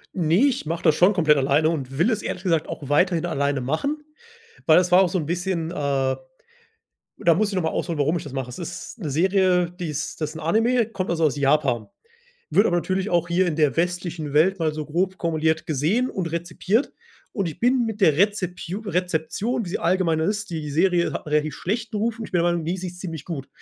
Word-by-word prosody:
Ne, 175 - +3
ich 255 - 0
mache 165 +1 -3
das 160 -3 +5
schon 180 +4 +5
komplett 155 -6 +4
alleine 140 +4 +3
und 135 -5 -4
will 180 - +3
es 220 - -1
ehrlich 180 - -5
gesagt 165 -4 +1
auch 140 - -6
weiterhin 170 +3 +2
alleine 140 -4 0
machen, 280 - -2 0.6
weil 155 - +7
das 180 0 +2
war 180 +2 +7
auch 180 - +3
so 185 - -1
'n 155 - -2
bisschen, 175 0 -2
äh 135 -4 0 1.0
da 170 - +4
muss 210 +3 +1
ich 200 - -4
nochmal 165 -4 0
ausholen, 170 -4 -2
warum 155 +4 +1
ich - - -9
das 145 - -9
mache. 130 -2 -4
Da 175 - -7
ist 175 +7 -7
'ne 165 - -4
Serie, 180 +3 +2
die 180 -1 -6
ist 150 +2 -4
das 155 +1 -3
'n 160 - -7
Anime, 225 +8 +2
kommt 205 -4 -4
also 165 -1 +1
aus 145 -3 +2
Japan. 140 -5 +1 0.6
Wird 205 - +4
aber 175 - +1
natürlich 190 +3 -1
auch 175 -1 +2
hier 180 +2 +2
in 155 - -2
der 150 -2 +2
westlichen 175 -3 -2
Welt 180 +4 +3
mal 155 -1 +1
so 155 -1 -5
grob 185 +4 -1
kumuliert 160 -1 0
gesehen 165 - +1
und 175 -4 -3
rezipiert. 175 - -1 0.4
Und 195 -4 -1
ich 155 - -8
bin 245 0 +3
mit 220 -1 -4
der 155 -7 +4
Rezepiu 185 -1 0
Rezeption, 195 +5 -2
wie 180 - -7
sie - - -2
allgemeiner 170 -3 +1
ist 210 +3 -1
die 155 -3 -4
Serie 175 +3 +2
hat - - -5
'n - - -6
relativ 150 0 0
schlechten 215 +3 -3
Ruf 225 +2 -1
und 220 - -4
ich - - -15
bin 180 - +2
der 170 +1 +2
Meinung: 170 -1 -2
„Ne, 175 +4 -1
sie 185 - -5
ist 180 0 -8
ziemlich 165 -6 -6
gut.“ 145 -6 -5
170 Hz, 230 wpm, -23 LUFS, 155-190 Hz, 1.0 s, weil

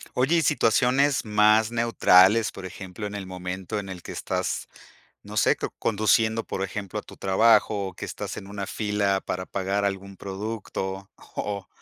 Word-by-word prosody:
Oye 135 +7 +3
y 165 - +4
situaciones 130 +1 +3
más 105 +1 +4
neutrales, 115 -2 +5
por 95 -1 -7
ejemplo, 95 +2 -7
en 105 - -7
el 100 -2 -5
momento 95 +2 -5
en 100 -1 -7
el 90 -2 -8
que - - -8
estás, - - -3 0.6
no 105 +1 -10
sé, - - +4
co - - -4
conduciendo, 110 +1 +2
por 95 - -3
ejemplo, 100 -1 -5
a - - -4
tu - - -14
trabajo 100 0 +3
o 95 - -7
que - - -7
estás - - -6
en 95 - -8
una 100 -1 -5
fila 100 -2 0
para 90 0 -3
pagar 100 +1 -1
algún 100 0 -3
producto 95 -1 -5 0.3
o 100 -2 -3
100 Hz, 175 wpm, -25 LUFS, 95-110 Hz, 0.6 s, neutrales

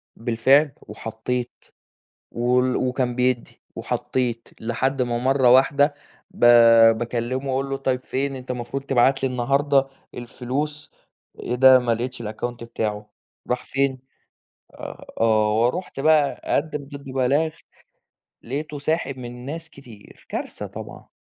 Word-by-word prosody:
بالفعل، 130 +6 +3
وحطيت، 115 +3 -5 0.7
وال 125 +1 +1
وكان 125 -1 -1
بيدّي، 125 -1 -1 0.2
وحطيت 120 -3 -2
لحد 130 +4 -1
ما 120 -1 -1
مرّه 130 0 +3
واحدة، 140 +3 +4 0.4
ب - - -18 0.6
باكلّمه 120 +3 -3
وأقول 135 +1 -1
له 135 - -1
طيّب 130 -2 -2
فين 135 +1 -2
أنت 130 -1 -10
المفروض 125 +2 -4
تبعت 135 0 +2
لي 135 - +2
النهارده 135 +2 +1 0.3
الفلوس، 135 +5 -5 0.5
إيه - - -3
ده 130 +1 +7
ما 120 -2 0
لقيتش 125 +2 -5
الأكاونت 115 +2 -5
بتاعه، 105 -2 -4 0.4
راح 125 0 -1
فين، 135 -1 -1 0.8
آآ - - -9
آه 110 -1 +3
ورُحت 135 +4 -1
بقى 150 -1 +4
أقدِّم 150 -1 -1
ضده 140 -1 -10
بلاغ، 135 +5 +1 0.9
لقيته 145 +4 -5
ساحب 145 -2 -2
من 125 0 -8
ناس 165 +3 -7
كتير، 120 -7 -16
كارثة - - -5
طبعًا. - - -10
130 Hz, 125 wpm, -23 LUFS, 120-140 Hz, 0.9 s, ده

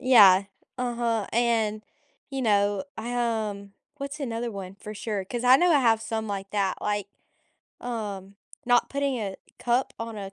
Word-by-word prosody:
Yeah. 200 -7 +7 0.3
Uh-huh, 235 -3 0
and, 225 -2 +1 0.5
you 270 -1 -3
know, 205 +1 +2
I, 240 +2 -4
um 215 -4 -2 0.2
what's 280 +1 -6
another 235 -2 -2
one? 195 -3 -7
For 210 - -8
sure, 205 -2 -3
'cause 240 +5 -4
I 255 +1 +8
know 355 +3 +3
I 295 - +6
have 225 -3 +3
some 220 -1 -3
like 195 -1 -4
that, 200 -2 0
like, 205 -1 -1 0.7
um, 205 -5 -5 0.3
not 245 -1 +4
putting 280 -2 0
a 195 -3 -4 0.2
cup 245 +2 +1
on 230 -1 -5
a, 195 -1 -6
225 Hz, 165 wpm, -26 LUFS, 200-245 Hz, 0.7 s, I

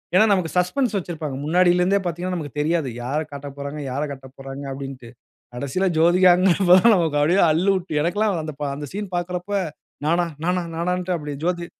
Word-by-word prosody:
ஏன்னா 210 +4 +7
நமக்கு 180 -4 0
சஸ்பென்ஸ் 220 +6 +1
வச்சிருப்பாங்க. 160 -6 -4
முன்னாடில 175 +2 +3
இருந்தே 195 +3 +3
பாத்தீங்கன்னா 175 +2 -2
நமக்கு 150 -3 -7
தெரியாது, 155 -2 0
யாரக் 150 +5 -3
காட்டப்போறாங்க, 140 +1 -7
யாரக் 145 +3 -2
காட்டப்போறாங்க 135 +1 -9
அப்டீன்ட்டு. 135 -3 -8 0.5
கடைசில 140 +9 -1
ஜோதிகான்ங்கிறப்போ 180 +2 +5
தான் 230 +4 +6
நமக்கு 165 -5 +1
அப்டியே 175 +7 +3
அல்லுவிட்டு 185 +1 +1
எனக்கெல்லாம் 190 +3 0
அந்த 155 0 -5
பா 145 - -2
அந்த 145 +1 -6
சீன் 200 -2 -6
பாக்குறப்ப, 180 +2 -3 0.5
"நானா, 170 +3 +2 0.2
நானா, 180 +1 +1
நானான்ட்டு" 180 +2 -1
அப்டி 150 -3 -5
ஜோதி 175 0 -1
170 Hz, 160 wpm, -22 LUFS, 145-180 Hz, 0.5 s, ஏன்னா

